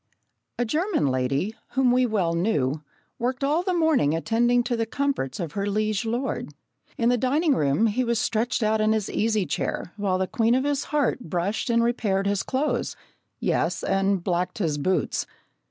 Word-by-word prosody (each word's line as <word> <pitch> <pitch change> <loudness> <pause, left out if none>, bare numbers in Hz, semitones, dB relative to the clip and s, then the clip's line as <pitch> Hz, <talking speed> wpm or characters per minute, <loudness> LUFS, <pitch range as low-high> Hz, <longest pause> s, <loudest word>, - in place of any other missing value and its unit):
A 245 - +1
German 320 - 0
lady, 135 +9 0 0.2
whom 265 -1 +3
we 250 0 +3
well 190 -7 0
knew, 155 -6 0 0.4
worked 250 +3 -2
all 300 +5 +2
the 370 - -1
morning 320 - +2
attending 240 +7 +2
to 245 0 -1
the 225 -1 -1
comforts 275 - -2
of 170 -5 -3
her 200 +3 -2
liege 215 +1 0
lord. 240 +4 -3 0.4
In 235 0 +2
the 245 -1 +2
dining 290 +5 +2
room 145 - +2
he 225 +3 +1
was 235 -1 0
stretched 230 +1 0
out 215 0 +2
in 215 +1 +3
an 215 - 0
easy 215 -3 +1
chair, 175 - -3
while 195 -3 0
the 190 - 0
queen 225 +4 +2
of 260 - +1
his 285 0 -1
heart 290 -4 0
brushed 185 - -1
and 235 0 +3
repaired 210 -5 0
his 200 -1 +1
clothes 260 -2 -1 0.4
yes, - - 0
and 195 -1 +1
blacked 180 0 -1
his 160 -8 -1
boots! 185 +5 0
220 Hz, 180 wpm, -25 LUFS, 190-250 Hz, 0.4 s, whom